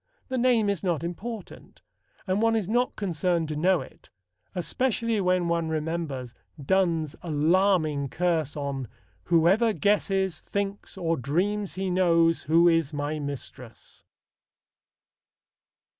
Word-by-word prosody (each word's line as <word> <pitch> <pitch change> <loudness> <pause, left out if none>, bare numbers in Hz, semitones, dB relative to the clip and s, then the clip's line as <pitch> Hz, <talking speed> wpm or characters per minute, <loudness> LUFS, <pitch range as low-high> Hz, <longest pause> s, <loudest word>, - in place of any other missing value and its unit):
The 260 - -1
name 235 -4 +3
is 200 -4 0
not 170 -5 -1
important, 200 +5 -7 0.4
and 190 +1 0
one 225 0 +3
is 215 -5 -1
not 240 +4 +1
concerned 175 -3 0
to 155 - -3
know 180 +4 +2
it, - - -14 0.5
especially 225 +5 0
when 180 -1 +1
one 170 -1 0
remembers 155 -6 -3 0.3
Donne's 165 -1 +1
alarming 160 -2 +2
curse 160 -1 -1
on: 140 -3 -3 0.4
Whoever 185 +7 +3
guesses, 195 -3 +1
thinks, 200 -1 -4
or 165 -3 0
dreams 190 - -1
he 190 0 -2
knows 170 -2 +3
Who 165 +3 +4
is 165 -4 +2
my 145 +1 -2
mistress. 135 -4 -8
175 Hz, 120 wpm, -26 LUFS, 155-200 Hz, 0.5 s, Who